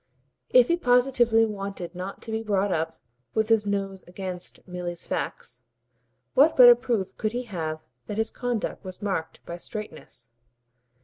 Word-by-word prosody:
If 250 -1 +6
he 340 - +2
positively 245 -5 +4
wanted 195 -4 -5
not 185 +2 -6
to 225 - -2
be 220 0 -1
brought 200 -2 0
up 160 -1 -1 0.4
with 220 0 +1
his 220 -2 +3
nose 195 -1 -2
against 180 0 -6
Milly's 175 -1 -5
facts, 125 0 -4 0.7
what 295 +4 +5
better 245 -2 +11
proof 225 -6 -2
could 215 0 -1
he 245 +1 -2
have 160 -8 -5 0.2
that 210 - -4
his 220 0 0
conduct 245 -3 -3
was 185 +1 -9
marked 190 -6 -3
by 170 - -6
straightness? 155 - -8
200 Hz, 150 wpm, -26 LUFS, 180-225 Hz, 0.7 s, better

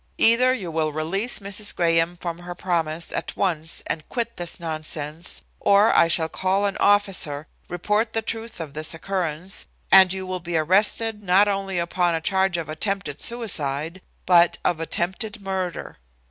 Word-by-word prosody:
Either 240 +3 +6
you 200 -10 -3
will 155 -1 0
release 190 +10 0
Mrs. 200 0 -2
Graham 165 0 +2
from 170 -1 -5
her 175 0 -8
promise 170 -3 -2
at - - -4
once 165 -4 -1
and 155 - -4
quit 235 -2 -3
this 175 -1 -4
nonsense, 155 0 -5 0.2
or 200 +2 +4
I 170 - +6
shall 165 -1 +2
call 190 +4 0
an 200 - -1
officer, 190 -8 +2 0.2
report 210 +6 0
the 225 - -1
truth 225 0 -5
of 155 -4 -6
this 155 +2 -2
occurrence, 180 0 -2 0.2
and 190 -1 +8
you 190 0 -3
will 185 0 -4
be 170 -1 -2
arrested 210 +6 +2
not 195 +1 +4
only 195 -2 -2
upon 175 0 +1
a - - -1
charge 190 +1 +1
of 165 -3 -4
attempted 155 -1 -3
suicide, 170 - -2 0.2
but 175 -1 +5
of 170 - +1
attempted 190 +7 -3
murder. 190 - -4
180 Hz, 160 wpm, -23 LUFS, 165-200 Hz, 0.2 s, and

